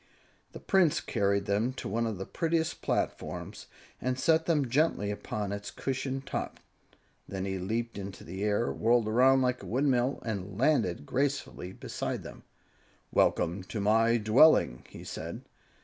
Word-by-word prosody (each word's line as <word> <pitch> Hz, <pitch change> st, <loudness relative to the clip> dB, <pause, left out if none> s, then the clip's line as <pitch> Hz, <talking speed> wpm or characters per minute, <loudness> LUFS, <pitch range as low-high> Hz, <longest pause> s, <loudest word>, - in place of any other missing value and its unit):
The -, -, -8 dB
Prince 185 Hz, -6 st, +3 dB
carried 100 Hz, 0 st, 0 dB
them 105 Hz, +6 st, 0 dB
to -, -, -6 dB
one 115 Hz, +3 st, 0 dB
of 110 Hz, -3 st, -3 dB
the 95 Hz, -, -5 dB
prettiest 165 Hz, -1 st, -1 dB
platforms -, -, -3 dB, 0.3 s
and 130 Hz, 0 st, -1 dB
set 160 Hz, +4 st, +2 dB
them 150 Hz, -5 st, +2 dB
gently 130 Hz, -6 st, +1 dB
upon 105 Hz, 0 st, -4 dB
its 100 Hz, 0 st, -5 dB
cushioned 135 Hz, 0 st, -3 dB
top. -, -, -4 dB, 0.7 s
Then 95 Hz, -1 st, -4 dB
he 95 Hz, -1 st, -2 dB
leaped 115 Hz, +4 st, -3 dB
into 95 Hz, -1 st, -7 dB
the 95 Hz, +4 st, -5 dB
air, 105 Hz, +3 st, +1 dB
whirled 115 Hz, 0 st, +2 dB
around 130 Hz, +4 st, +5 dB
like 125 Hz, 0 st, 0 dB
a -, -, -9 dB
windmill 130 Hz, +1 st, +1 dB
and 100 Hz, -3 st, -4 dB
landed 115 Hz, -, +2 dB
gracefully 135 Hz, -, -2 dB
beside -, -, -4 dB
them. -, -, -10 dB, 0.7 s
"Welcome 85 Hz, +3 st, +2 dB
to 110 Hz, -, -5 dB
my 115 Hz, +3 st, +3 dB
dwelling," 110 Hz, -, +4 dB
he -, -, -10 dB
said. -, -, -6 dB
115 Hz, 150 wpm, -30 LUFS, 100-135 Hz, 0.7 s, around